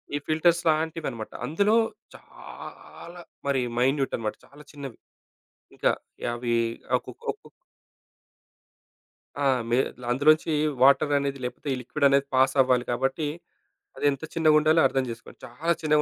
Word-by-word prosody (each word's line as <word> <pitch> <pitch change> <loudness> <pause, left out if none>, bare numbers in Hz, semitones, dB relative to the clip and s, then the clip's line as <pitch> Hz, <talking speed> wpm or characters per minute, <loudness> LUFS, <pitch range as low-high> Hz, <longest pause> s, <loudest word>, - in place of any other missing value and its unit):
ఈ - - +1
ఫిల్టర్స్ 165 +2 +3
లాంటివన్నమాట. 155 -7 -1
అందులో 200 +8 +2 0.4
చాలా 175 +1 -12 0.3
మరి 135 -2 +1 0.2
మైన్యూటన్నమాట. 130 -4 0
చాలా 145 +1 -16
చిన్నవి. 140 -5 -9 0.8
ఇంకా - - +2 0.4
యవి 120 0 -1 0.4
అకుకొకు - - -7 2.0
ఆ! - - +2 0.2
మే 120 - +2 0.3
అందులోంచి 155 +5 +3 0.3
వాటర్ 140 +2 +5
అనేది 140 -1 -3
లేకపోతే 125 +4 -6
ఈ - - -1
లిక్విడ్ 130 +3 -1
అనేది 140 0 +3
పాస్ 130 +1 +4
అవ్వాలి 125 -1 +2
కాబట్టి 135 +5 -1 0.7
అది - - -3
ఎంత 140 +2 -6
చిన్నగుండాలో 155 0 +4
అర్థం 135 0 -1
జేసుకోండి. 115 0 -10
చాలా 155 +8 -1
చిన్నగా 150 -1 +3
140 Hz, 115 wpm, -26 LUFS, 130-155 Hz, 2.0 s, వాటర్